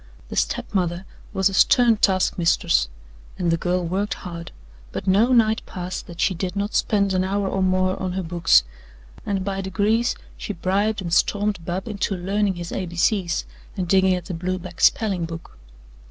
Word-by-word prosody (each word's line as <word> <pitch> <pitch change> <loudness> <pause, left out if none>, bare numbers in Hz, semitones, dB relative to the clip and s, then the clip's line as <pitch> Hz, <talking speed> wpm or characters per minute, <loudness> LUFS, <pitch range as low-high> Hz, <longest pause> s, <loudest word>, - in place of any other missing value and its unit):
The - - -6
step - - -1
mother 180 -1 -1 0.3
was 190 0 +2
a 195 - -2
stern 235 +3 +5
taskmistress, 175 - +2 0.5
and 175 -2 0
the - - +3
girl 180 +1 -1
worked 190 +2 -1
hard, 170 -1 -8 0.4
but - - -5
no 205 +6 +4
night 220 -3 +4
passed 180 0 -5
that 170 -1 -11
she 190 - +2
did 180 +2 -4
not 200 +1 -2
spend 200 -2 +2
an 185 0 +2
hour 195 +1 -1
or 190 0 -1
more 185 0 +1
on 185 -1 -2
her 190 0 -2
books, 165 - +4 0.6
and 195 -2 -1
by 195 -1 -2
degrees 210 +5 +1 0.2
she 210 - -5
bribed 200 +3 0
and 170 -2 -3
stormed 205 -2 +1
Bub 180 +4 -4
into 200 -2 -2
learning 195 +2 0
his 175 -1 -6
A, 185 - -3
B, 170 - -9
C's 175 -1 +1 0.3
and 185 -2 -2
digging 190 0 +4
at 180 +1 -6
a - - -3
blue 180 +2 -2
back 175 -1 -9
spelling 195 -6 +3
book. 165 0 -9
185 Hz, 185 wpm, -23 LUFS, 175-200 Hz, 0.6 s, stern